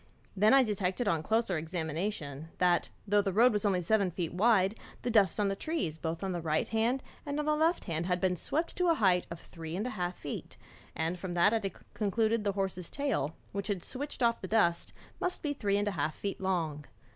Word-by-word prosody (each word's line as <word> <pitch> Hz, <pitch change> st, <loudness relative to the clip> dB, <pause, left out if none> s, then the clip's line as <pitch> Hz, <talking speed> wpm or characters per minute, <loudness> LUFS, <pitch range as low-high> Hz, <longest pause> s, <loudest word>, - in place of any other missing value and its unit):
I -, -, -8 dB
then 255 Hz, +6 st, +6 dB
detected 200 Hz, +1 st, -1 dB
on 165 Hz, -5 st, +2 dB
closer 220 Hz, -1 st, +1 dB
examination, 160 Hz, -2 st, -3 dB
that 175 Hz, -2 st, +3 dB, 0.2 s
though 205 Hz, +1 st, +4 dB
the 195 Hz, -1 st, -1 dB
road 230 Hz, +5 st, +5 dB
was 210 Hz, 0 st, 0 dB
only 190 Hz, -3 st, +2 dB
seven 200 Hz, +2 st, +2 dB
feet 170 Hz, -1 st, -3 dB
wide, 195 Hz, 0 st, +4 dB, 0.3 s
the 240 Hz, -, 0 dB
dust 215 Hz, -2 st, +4 dB
on 205 Hz, -, +3 dB
the 195 Hz, -, 0 dB
trees 195 Hz, -, -2 dB
both 165 Hz, +3 st, -3 dB
on 190 Hz, -, -1 dB
the 175 Hz, -1 st, -2 dB
right 155 Hz, -1 st, 0 dB
hand 230 Hz, +4 st, +1 dB, 0.2 s
and 285 Hz, 0 st, -3 dB
on 300 Hz, -, -1 dB
the 305 Hz, 0 st, +2 dB
left 325 Hz, +3 st, +2 dB
had 175 Hz, +1 st, -1 dB
been 185 Hz, -1 st, +1 dB
swept 315 Hz, -, -2 dB
to 360 Hz, -, +2 dB
a 335 Hz, -, +5 dB
height 185 Hz, -, +3 dB
of 170 Hz, -, -7 dB
three 165 Hz, 0 st, -8 dB
and 205 Hz, +5 st, -2 dB
a 250 Hz, -, -2 dB
half 180 Hz, -4 st, -3 dB
feet, 145 Hz, -, -6 dB, 0.4 s
and 165 Hz, +3 st, -1 dB
from 175 Hz, -1 st, -4 dB
that 175 Hz, +5 st, +5 dB
I 215 Hz, -3 st, 0 dB, 0.2 s
concluded 220 Hz, +1 st, +1 dB
the 200 Hz, -1 st, 0 dB
horse's 190 Hz, -3 st, -2 dB
tail, 275 Hz, -, -1 dB, 0.2 s
which 200 Hz, 0 st, -3 dB
had 195 Hz, -5 st, -2 dB
switched 275 Hz, 0 st, -5 dB
off 235 Hz, 0 st, +2 dB
the 190 Hz, -, -5 dB
dust, 175 Hz, -5 st, +2 dB, 0.3 s
must 360 Hz, -, -2 dB
be 295 Hz, -2 st, 0 dB
three 200 Hz, -7 st, 0 dB
and 205 Hz, 0 st, 0 dB
a -, -, +1 dB
half 155 Hz, -3 st, -1 dB
feet 200 Hz, -1 st, -4 dB
long. 165 Hz, -6 st, -1 dB
195 Hz, 220 wpm, -31 LUFS, 175-225 Hz, 0.4 s, then